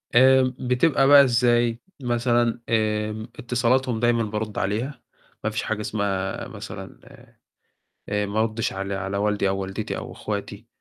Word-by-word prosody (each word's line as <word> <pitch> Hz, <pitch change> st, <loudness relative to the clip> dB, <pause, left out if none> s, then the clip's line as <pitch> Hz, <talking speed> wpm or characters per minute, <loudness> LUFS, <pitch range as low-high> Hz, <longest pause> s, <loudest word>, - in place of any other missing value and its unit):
آمم 130 Hz, 0 st, +5 dB
بتبقى 135 Hz, +2 st, +2 dB
بقى 140 Hz, -1 st, +9 dB
إزاي 120 Hz, -1 st, +2 dB, 0.2 s
مثلًا؟ 120 Hz, -1 st, +1 dB
آمم، 110 Hz, 0 st, 0 dB
اتصالاتهم 125 Hz, 0 st, +1 dB
دايمًا 120 Hz, -1 st, +2 dB
بارُد 105 Hz, 0 st, -4 dB
عليها، 115 Hz, +7 st, -2 dB, 0.4 s
ما 110 Hz, -, +1 dB
فيش 110 Hz, -, -3 dB
حاجة 105 Hz, -1 st, -2 dB
اسمها 100 Hz, -3 st, -2 dB
مثلًا -, -, -9 dB, 1.1 s
آآ 105 Hz, 0 st, 0 dB
ما 105 Hz, +2 st, -1 dB
أردش 110 Hz, 0 st, -1 dB
على 95 Hz, +1 st, -4 dB
على 95 Hz, +1 st, -3 dB
والدي 105 Hz, -1 st, +1 dB
أو 95 Hz, 0 st, -1 dB
والدتي 95 Hz, 0 st, -4 dB
أو -, -, -7 dB
أخواتي، -, -, -5 dB
110 Hz, 140 wpm, -24 LUFS, 105-125 Hz, 1.1 s, بقى